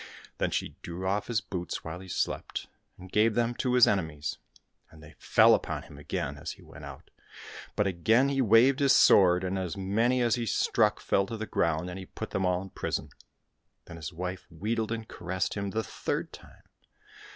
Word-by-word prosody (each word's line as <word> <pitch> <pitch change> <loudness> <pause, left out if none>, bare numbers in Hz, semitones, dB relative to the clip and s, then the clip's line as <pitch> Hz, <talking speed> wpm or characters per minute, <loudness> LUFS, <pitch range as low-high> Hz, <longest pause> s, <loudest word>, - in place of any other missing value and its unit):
Then - - +1
she - - -3
drew 90 +2 -6
off 100 +2 0
his 115 -3 0
boots 90 -2 -5
while 80 +2 -6
he 95 - -11
slept, - - -3 0.3
and 95 0 -12
gave 105 +1 +3
them 120 0 +1
to 125 +1 0
his 125 - +7
enemies. 80 -7 -1 0.5
And 80 -1 -16
they 75 - -13
fell - - +5
upon - - -1
him 70 - -13
again 70 -1 -3
as 80 +3 -5
he - - -17
went - - -12
out, - - -11 0.6
but 105 - +2
again 110 +8 +3
he 135 -1 +1
waved 125 +4 +5
his 140 -1 +5
sword, 90 -2 +6
and 95 +1 -1
as 90 0 -4
many 115 +6 +1
as 120 - +2
he 120 -2 -1
struck - - +2
fell 100 0 +1
to 115 - -5
the 110 - -4
ground, 85 -3 0
and 90 +1 -6
he 95 - -9
put - - -7
them 95 -1 0
all 90 +1 0
in 95 - -11
prison. - - -3 0.8
Then 85 - -10
his 75 -2 -6
wife 90 +2 -5
wheedled 110 +6 -2
and 115 -1 -4
caressed 90 0 -3
him 100 -1 -3
the 110 +3 -2
third - - -4
time. - - -14
95 Hz, 200 wpm, -29 LUFS, 90-115 Hz, 0.8 s, his